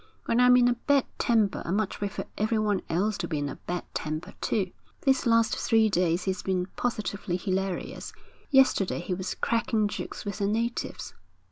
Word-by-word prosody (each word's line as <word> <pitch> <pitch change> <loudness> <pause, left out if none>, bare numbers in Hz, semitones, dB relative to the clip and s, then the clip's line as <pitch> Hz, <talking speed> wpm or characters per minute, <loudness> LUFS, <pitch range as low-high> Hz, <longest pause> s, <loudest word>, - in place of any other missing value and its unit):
When 230 - +2
I'm 250 0 +7
in 245 -1 +5
a 245 - +4
bad 275 +3 +2
temper, 220 -4 +2
I - - -7
much 200 +2 -1
prefer 200 -1 -3
everyone 215 -2 +1
else 200 +5 0
to - - -2
be 155 - -2
in 145 0 -1
a 140 - -6
bad 175 0 -2
temper, 155 +1 -4
too.' 190 -5 0 0.3
'These 265 -2 +2
last 230 0 +4
three 225 -1 +3
days 175 -1 +1
he's 190 -1 -2
been 185 -2 0
positively 210 -6 -2
hilarious. 190 0 -3 0.4
Yesterday 265 - +4
he 180 - -3
was 185 +1 -3
cracking 230 -2 +1
jokes 205 - -6
with 205 +1 -4
the 200 - +1
natives.' 230 +3 -2
205 Hz, 175 wpm, -27 LUFS, 185-230 Hz, 0.4 s, I'm